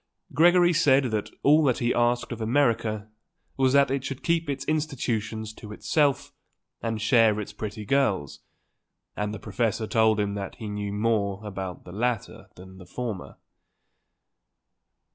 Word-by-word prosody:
Gregory 175 +2 +5
said 140 -6 +3
that 105 -1 -2
all 150 +3 +5
that 130 -4 +2
he 120 0 +1
asked 120 +1 +1
of 120 -1 -5
America 115 -4 +1 0.5
was 130 -1 +2
that 140 -1 +4
it 135 -1 -1
should 135 -1 -6
keep 165 -2 0
its 140 -2 -3
institutions 115 -8 -2
to 105 -1 -11
itself 145 +5 0 0.5
and 115 -1 -2
share 110 -2 +4
its 105 0 -6
pretty 105 0 -6
girls, 105 - 0 0.8
and 105 0 -2
the 110 - -5
professor 110 +2 -2
told 110 -1 +3
him 100 -1 0
that 100 -1 -5
he 110 - -7
knew 105 -1 -4
more 105 -1 -1
about 95 -3 -6
the 90 - -10
latter 115 +2 -3
than 95 +1 -13
the 90 - -13
former. 105 - -6
110 Hz, 150 wpm, -26 LUFS, 105-135 Hz, 0.8 s, Gregory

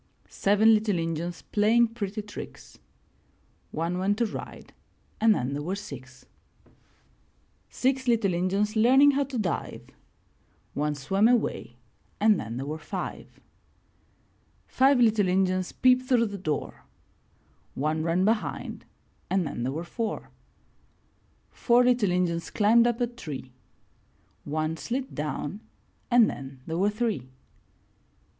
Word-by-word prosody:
Seven 210 +3 +4
little 210 -3 +1
Injuns 165 +1 -3
playing 225 +3 +3
pretty 215 -2 -4
tricks 205 - -10 0.5
— - - -39
One 175 +2 -1
went 200 +2 +1
to 235 - +2
ride 215 - -8 0.5
and 220 -1 +5
then 125 -2 -2
there 145 - -3
were 180 +6 -3
six. 130 -10 -10 1.4
Six 260 0 0
little 225 -6 +2
Injuns 195 +5 0
learning 265 +6 +6
how 280 0 0
to 265 -2 -5
dive 195 -6 -3 0.4
— - - -39
One 150 0 0
swam 195 +10 +2
away 225 - 0 0.4
and 210 -2 +4
then 115 +2 -5
there 135 - -4
were 155 +2 -5
five. - - -7 1.3
Five 270 0 +3
little 220 -4 +4
Injuns 185 0 +1
peeped 255 0 +3
through 240 -3 +4
the 205 -2 -5
door 155 -5 -4 0.5
— - - -37
One 155 +1 0
ran 170 +3 +1
behind 220 +1 -2 0.4
and 190 -2 +1
then 120 - -5
there 125 +2 -1
were 160 +4 -4
four. 220 +5 -4 1.2
Four 245 0 +3
little 245 -5 +3
Injuns 175 -2 0
climbed 230 +3 +4
up 240 0 -1
a - - +4
tree 155 - -8 0.5
— - - -38
One 155 +2 -2
slid 260 +9 -4
down 150 +5 -4 0.5
and 240 -3 +6
then 135 -1 -7
there 165 +1 -3
were 200 +2 +3
three. 210 - -2
200 Hz, 135 wpm, -27 LUFS, 165-230 Hz, 1.4 s, learning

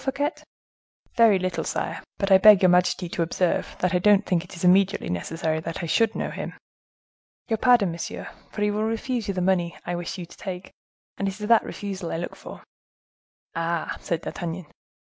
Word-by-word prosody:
Fouquet?" 280 +2 0 0.8
"Very 230 -4 +6
little, 185 -3 -2
sire; 165 - -3 0.2
but 195 0 -1
I 190 - +8
beg 210 -1 +8
your 185 - +7
majesty 180 0 +2
to 170 - -3
observe 170 +1 0
that 180 +1 +1
I 180 - +3
don't 205 +2 +4
think 175 -3 +1
it 180 -1 -10
immediately 190 - +3
necessary 160 - -2
that 165 +1 -5
I - - -1
should 225 +6 +2
know - - -3
him." - - -6 1.0
"Your 225 - +1
pardon, 230 -6 +4
monsieur; 170 0 -6 0.2
for 210 - -3
he 210 - +2
will 210 +1 -1
refuse 225 +1 -2
you 195 - -2
the 185 - -1
money 180 -2 +1
I 175 - -3
wish 175 +2 -4
you 180 - -6
to - - -16
take; 185 -2 -7 0.5
and 200 - 0
it 195 +2 -4
is 210 - -4
that 230 0 +5
refusal 195 -4 -5
I - - -2
look 175 - -5
for." - - -11 0.9
"Ah!" 165 0 -2
said 170 -1 -2
D'Artagnan. 175 0 -5
185 Hz, 195 wpm, -25 LUFS, 170-210 Hz, 1.0 s, I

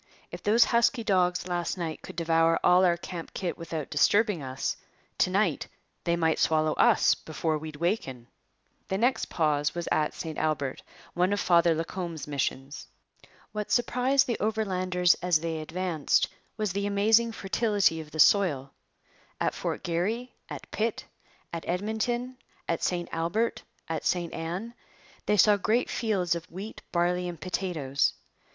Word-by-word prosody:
'If - - -7
those 225 +3 +5
husky 235 0 +2
dogs 180 -3 +1
last 175 +1 -2
night 165 -3 -4
could - - -10
devour 165 0 +2
all 180 +1 +5
our 175 -2 +3
camp 170 -1 -8
kit 180 -3 -2
without 165 -3 -6
disturbing 200 +4 +3
us, 130 0 -3 0.4
to - - +3
night - - +1 0.4
they 170 - +2
might 160 -2 +1
swallow 155 -1 +2
us - - +4
before 155 0 -2
we'd 155 0 -7
waken.' 145 - -2 0.6
The 190 - -1
next 245 +5 +1
pause 150 -2 0
was 175 -1 -4
at 150 -1 +1
St 160 -2 -5
Albert, 145 -4 -1 0.3
one 180 +2 +1
of 205 - +1
Father 170 -3 +4
Lacombe's 165 0 -4
missions. 140 0 -3 0.6
What 210 -1 -4
surprised 250 +2 +2
the 235 - -2
Overlanders 185 -5 +2
as 175 -3 +2
they 165 -1 -2
advanced 165 -1 0 0.3
was 210 -4 -1
the 200 +1 -1
amazing 220 +3 +3
fertility 200 -5 +1
of 155 - -11
the 155 +1 -8
soil. 145 -5 +4 0.7
At - - 0
Fort - - -4
Garry, 215 +9 -2 0.2
at - - -8
Pitt, 220 0 -2 0.5
at 170 - -4
Edmonton, 220 +7 -2 0.3
at 165 - -1
St 175 -1 -1
Albert, 170 +8 -1 0.3
at 160 -1 -3
St 175 -2 -1
Ann, 175 +8 -4 0.5
they 210 - +3
saw 205 +2 +6
great 220 +5 +1
fields 195 -7 0
of 170 -1 -6
wheat, 195 +6 -8
barley, 180 +1 +1
and 170 -3 -8
potatoes. 160 -6 -1
175 Hz, 150 wpm, -28 LUFS, 160-210 Hz, 0.7 s, saw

